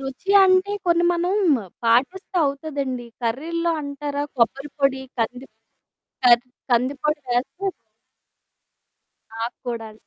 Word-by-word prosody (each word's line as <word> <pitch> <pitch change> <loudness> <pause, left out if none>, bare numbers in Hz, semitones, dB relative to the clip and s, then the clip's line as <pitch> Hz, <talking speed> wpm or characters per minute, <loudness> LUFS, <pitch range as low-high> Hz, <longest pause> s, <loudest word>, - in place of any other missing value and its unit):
రుచి 270 +8 -5
అంటే 375 +2 +3
కొన్ని 345 0 +3
మనం 350 +2 0 0.5
పాటిస్తే 270 - +1
అవుతదండి. 275 -3 -3 0.2
కర్రీల్లొ 330 +9 -1
అంటారా? 285 0 -3
కొబ్బరి 270 +5 +1
పొడి, 270 -1 +2 0.2
కందిప్ 245 +3 -3 0.7
కర్ 240 -1 +7 0.3
కందిపొడి 275 +5 +1
వేస్తే 250 +11 -1 1.7
నాకు 230 +1 -4
కూడా. 225 -2 -4
275 Hz, 95 wpm, -23 LUFS, 245-335 Hz, 1.7 s, కర్